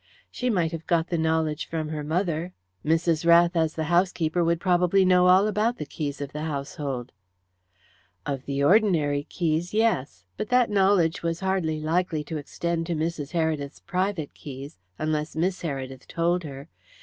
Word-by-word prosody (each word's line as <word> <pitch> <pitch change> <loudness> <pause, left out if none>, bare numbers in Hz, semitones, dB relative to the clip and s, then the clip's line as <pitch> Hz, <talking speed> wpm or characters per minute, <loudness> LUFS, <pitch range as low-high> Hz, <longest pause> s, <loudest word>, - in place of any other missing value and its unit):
"She 250 - -2
might 175 -7 +1
have 165 -1 -7
got 170 -1 +1
the 170 - 0
knowledge 160 -1 0
from 160 -2 -3
her 155 -1 -4
mother. 170 +2 -1 0.3
Mrs. 165 +1 +1
Rath, 170 +1 +5
as 160 -1 +1
the 160 - -1
housekeeper, 175 0 +1
would 170 0 +1
probably 180 +1 +3
know 180 0 +5
all 185 +2 +6
about 215 +3 +1
the 150 - -5
keys 145 -1 -4
of 140 -1 -5
the 150 - -4
household." 140 -4 -4 1.1
"Of 135 -2 -3
the 140 0 -1
ordinary 155 -6 +3
keys 170 +2 -1
yes. 135 - 0
But - - -4
that 250 -3 +3
knowledge 190 -4 +3
was 165 +1 -2
hardly 185 -5 0
likely 160 0 0
to 155 +2 -5
extend 165 +3 -3
to 170 - -1
Mrs. 155 -2 -3
Heredith's 155 -4 -1
private 185 -4 -2
keys, 135 -5 -9 0.2
unless 155 0 -2
Miss 180 +4 0
Heredith 135 -4 -5
told 170 +1 0
her. 140 0 -8
165 Hz, 165 wpm, -26 LUFS, 150-180 Hz, 1.1 s, all